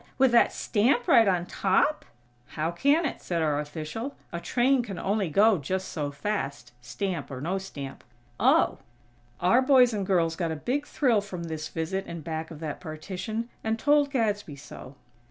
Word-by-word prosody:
With 265 -1 +4
that 235 - +5
stamp 240 +3 +1
right 230 -5 +6
on 180 -2 +1
top?" 195 +13 +1 0.4
"How 160 +2 -2
can 285 - +2
it?" 280 - -3
said 170 -2 -1
our 150 -2 +1
official. 155 - -5 0.2
"A 170 - -2
train 255 +7 +2
can 205 -6 -7
only 200 -2 0
go 205 +4 +4
just 185 +7 -3
so 150 -3 -3
fast, 140 - -4
stamp 145 +7 -4
or 130 -2 -6
no 180 +7 -2
stamp." 140 -8 -8 0.4
"Oh." - - +3 0.6
Our 185 +9 +4
boys 255 -3 +5
and 205 -2 -1
girls 170 -4 +1
got 170 -1 -2
a - - -2
big 270 - -2
thrill 240 -7 +2
from 185 -4 -7
this 160 -2 -5
visit 180 +4 -3
in 170 -1 -6
back 160 0 -4
of 160 - -10
that 155 -3 -4
partition, 190 +8 -5
and 220 0 0
told 290 +3 +3
Gadsby 210 - -1
so. 140 -1 -11
190 Hz, 175 wpm, -27 LUFS, 160-230 Hz, 0.6 s, right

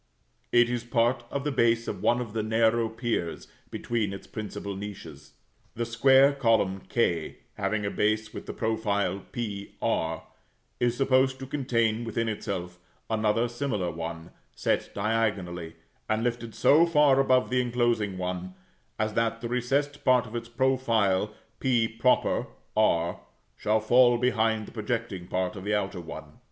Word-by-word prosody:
It 120 0 +5
is 120 -1 -2
part 120 +1 +1
of 140 - -3
the 150 - -1
base 115 -2 +2
of - - -4
one 120 - +3
of 115 -4 -5
the 110 - 0
narrow 110 +1 +2
piers 115 -7 -3 0.2
between 110 -4 -2
its 100 - -8
principal 100 -2 -6
niches. 80 -8 -9 0.4
The 120 - -2
square 135 +4 +5
column 115 -8 +1
k, 85 -9 0 0.2
having 105 -1 -1
a 100 - -1
base 110 +1 0
with - - -8
the - - -4
profile 105 -3 -1
p 100 -4 -5
r, 80 0 -1 0.6
is 120 0 +1
supposed 130 -1 +3
to 135 - -7
contain 120 -5 0
within 115 0 -2
itself 90 -4 -4 0.3
another 110 +2 +2
similar 120 -8 -2
one, 80 0 -6 0.2
set - - 0
diagonally, 100 -6 -1 0.3
and 110 +1 +1
lifted 120 -2 -3
so 160 +4 +5
far 150 -4 +4
above 130 -2 +3
the 125 0 +3
inclosing 120 -5 0
one, 90 0 -4 0.4
as 110 0 -1
that 115 0 0
the 120 - -4
recessed 135 +4 -1
part 125 -1 +4
of 115 0 -9
its 115 0 -5
profile 115 -6 +1 0.3
[=p] 115 -3 +1 0.8
r 85 -6 +2 0.4
shall 110 +1 +1
fall 120 +2 +5
behind 110 -3 +1
the - - -12
projecting 110 -5 -3
part 90 +2 -1
of 95 - -7
the 105 +1 0
outer 95 -3 -2
one. 80 - -10
115 Hz, 150 wpm, -27 LUFS, 100-120 Hz, 0.8 s, It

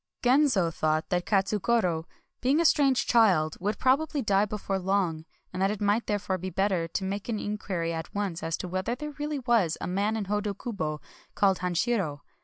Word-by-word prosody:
Genzo 245 - +3
thought 155 +1 0
that 180 -1 -1
Katsugoro, 195 -4 +1 0.4
being 270 +5 +3
a 335 - +2
strange 275 -4 +4
child, 185 -10 +3
would 205 +3 -1
probably 285 +2 +1
die 200 -1 +3
before 200 -2 -3
long, 180 -4 0 0.3
and 185 - -3
that 195 - +3
it 210 -1 -3
might 205 +3 +1
therefore 200 -2 -1
be 185 +2 -4
better 185 -2 0
to 190 - -3
make 200 +3 -4
in 210 -2 -2
quiry 170 -5 -2
at 165 +3 -6
once 200 -5 -2
as 165 0 -2
to - - -5
whether 185 +6 -2
there 300 +3 -6
really 295 0 -2
was 235 - +1
a - - -4
man 200 +4 0
in 210 - -2
Hodokubo 200 -6 -3 0.3
called 195 -2 +3
Hanshiro. 180 -4 -1
200 Hz, 185 wpm, -28 LUFS, 180-230 Hz, 0.4 s, strange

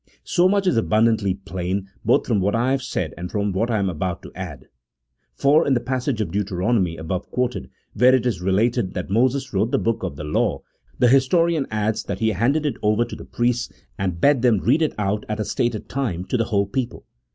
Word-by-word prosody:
So 180 +1 +3
much 200 0 +1
is 180 - +2
abundantly 110 -3 +2
plain 95 0 -4 0.2
both 115 - +3
from 110 -5 +1
what 100 +3 +1
I 120 +3 +1
have 135 0 +1
said - - -3
and 90 +1 -5
from 105 -1 -1
what 105 +6 0
I 115 - +1
am 100 -2 0
about 90 0 -3
to - - -10
add. 80 -8 -7 0.7
For 150 +4 +3
in 135 - +3
the - - +2
passage 125 0 -2
of 105 - -3
Deuteronomy 95 -2 0
above 85 +4 -4
quoted, 125 0 -2 0.2
where 125 +1 +5
it 125 -2 0
is 110 -8 -1
related 100 +2 +1
that 90 +1 -4
Moses 130 +4 +1
wrote 100 +4 +1
the - - +1
book 115 0 -1
of - - -4
the 75 - -7
law, 95 - 0 0.3
the 125 - +3
histo 135 +6 +4
rian 165 -5 0
adds 110 0 -1
that 100 - -3
he 110 +2 +1
handed 125 - +1
it 140 -6 -1
over 110 +2 +2
to - - -8
the - - -10
priests 120 0 -1 0.2
and 90 -3 -2
bade 140 +4 +4
them 120 -4 +4
read 130 - +2
it 155 - 0
out 105 0 -1
at 105 0 -2
a 105 - -1
stated 120 -3 -2
time 105 -10 -2
to - - -2
the 115 - +1
whole 100 -3 +1
people. 125 +4 -4
110 Hz, 225 wpm, -22 LUFS, 95-125 Hz, 0.7 s, where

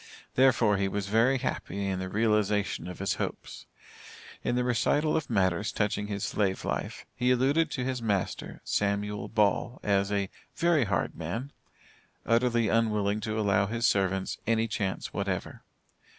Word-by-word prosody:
Therefore, 120 -5 +4
he 100 0 +1
was 100 +1 -2
very 115 +5 +4
happy 100 -5 -3
in 95 -1 -1
the 95 0 -4
realization 105 -2 +1
of 90 - -7
his 100 - 0
hopes. - - -5 0.8
In 120 - 0
the 125 - +1
recital 125 +5 +2
of 160 -2 -1
matters 100 -2 +1
touching 105 -1 -1
his 100 -1 -3
slave 95 -3 -1
life, - - -3
he 125 +1 +1
alluded 140 +6 +3
to 130 - -3
his 130 -1 -2
master, 100 -5 -2
Samuel 100 0 -1
Ball, 110 +3 +1
as 100 -1 +1
a 100 -1 -1 0.2
"very 170 -6 +3
hard 100 -3 -1
man," 100 - -4 0.7
utterly 115 0 +2
unwilling 105 -2 +1
to 110 +1 -2
allow 100 -1 +2
his 115 +2 +1
servants 95 -1 0
any 115 0 +2
chance 100 -3 -3
whatever. - - -3
105 Hz, 150 wpm, -29 LUFS, 100-120 Hz, 0.8 s, Therefore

